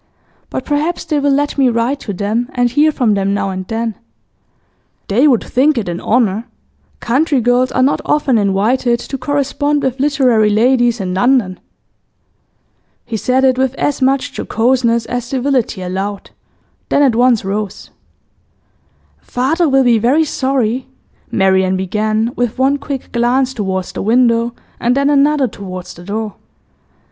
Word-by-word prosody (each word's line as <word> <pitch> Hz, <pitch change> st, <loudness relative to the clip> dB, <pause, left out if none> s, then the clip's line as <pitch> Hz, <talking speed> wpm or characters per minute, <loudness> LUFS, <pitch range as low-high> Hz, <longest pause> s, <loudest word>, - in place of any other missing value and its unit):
'But -, -, -5 dB
perhaps 305 Hz, +4 st, -1 dB
they 310 Hz, -3 st, 0 dB
will 285 Hz, 0 st, +1 dB
let 285 Hz, +1 st, 0 dB
me 265 Hz, -2 st, +4 dB
write 235 Hz, +4 st, -1 dB
to 205 Hz, -, -6 dB
them, 210 Hz, +5 st, -2 dB
and 245 Hz, -1 st, +1 dB
hear 300 Hz, +4 st, +3 dB
from 245 Hz, -7 st, +1 dB
them 195 Hz, 0 st, 0 dB
now 195 Hz, -1 st, -2 dB
and 185 Hz, 0 st, -6 dB
then.' 225 Hz, 0 st, -2 dB, 1.2 s
'They 245 Hz, +9 st, +3 dB
would 250 Hz, -6 st, +3 dB
think 275 Hz, +3 st, +1 dB
it 215 Hz, -5 st, -2 dB
an 175 Hz, 0 st, -4 dB
honour. 225 Hz, -1 st, 0 dB, 0.5 s
Country 275 Hz, +4 st, +1 dB
girls 245 Hz, +2 st, +2 dB
are 255 Hz, -, +1 dB
not 275 Hz, -, +1 dB
often 275 Hz, -6 st, +1 dB
invited 225 Hz, +5 st, +1 dB
to 270 Hz, -, -5 dB
correspond 285 Hz, +2 st, -1 dB
with 265 Hz, 0 st, -2 dB
literary 260 Hz, -6 st, +2 dB
ladies 240 Hz, +2 st, +2 dB
in 185 Hz, -2 st, -3 dB
London.' 200 Hz, -2 st, +1 dB, 1.5 s
He 235 Hz, -, -5 dB
said 255 Hz, +4 st, +1 dB
it 260 Hz, -1 st, +3 dB
with 265 Hz, 0 st, 0 dB
as 285 Hz, -1 st, -1 dB
much 270 Hz, +1 st, +1 dB
jocoseness 235 Hz, -1 st, 0 dB
as 245 Hz, -1 st, -3 dB
civility 250 Hz, -6 st, -1 dB
allowed, 195 Hz, +2 st, -4 dB, 0.6 s
then 290 Hz, -, +3 dB
at 265 Hz, -4 st, +3 dB
once 240 Hz, -3 st, +2 dB
rose. 205 Hz, +1 st, -4 dB, 1.3 s
'Father 305 Hz, +7 st, 0 dB
will 270 Hz, 0 st, +3 dB
be 240 Hz, -3 st, +3 dB
very 260 Hz, +8 st, +3 dB
sorry,' 260 Hz, -3 st, -1 dB, 0.4 s
Marian 190 Hz, -3 st, +2 dB
began, 215 Hz, +4 st, -1 dB
with 245 Hz, -1 st, -2 dB
one 270 Hz, +2 st, +2 dB
quick 280 Hz, -2 st, -6 dB
glance 250 Hz, +2 st, +1 dB
towards 190 Hz, -5 st, -3 dB
the -, -, -5 dB
window 235 Hz, +1 st, +2 dB, 0.2 s
and 245 Hz, +2 st, +1 dB
then 280 Hz, +1 st, +2 dB
another 285 Hz, -1 st, +3 dB
towards 185 Hz, -4 st, -8 dB
the 175 Hz, -, -13 dB
door. 210 Hz, +2 st, -4 dB
245 Hz, 155 wpm, -15 LUFS, 215-270 Hz, 1.5 s, me